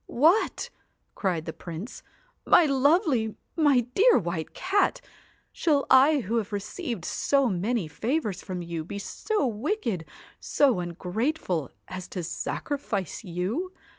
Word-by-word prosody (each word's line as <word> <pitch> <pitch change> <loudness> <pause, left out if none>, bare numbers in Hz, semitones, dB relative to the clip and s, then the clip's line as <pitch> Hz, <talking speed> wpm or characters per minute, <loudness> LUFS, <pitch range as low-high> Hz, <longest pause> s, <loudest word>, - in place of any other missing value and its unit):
'What!' 320 - +2 0.4
cried 175 -5 -1
the 160 - -5
Prince, 175 +8 -8 0.4
'my 350 - +6
lovely, 275 - +2 0.2
my 290 -6 +4
dear 465 - +6
White 170 -5 -3
Cat! 390 +2 +1 0.5
shall 295 -4 +2
I 275 +2 +6
who 230 +2 -1
have 220 -2 -2
received 210 - -4
so 275 -2 +2
many 205 0 0
favours 220 - -2
from 180 -2 -5
you, 170 -2 -4
be 190 +5 -6
so 415 - -1
wicked, 230 - -2 0.3
so 270 -9 +2
ungrateful, 180 - -2 0.2
as 185 -1 -6
to 180 - -5
sacrifice 200 - -3
you 205 - -3
225 Hz, 125 wpm, -27 LUFS, 180-290 Hz, 0.5 s, my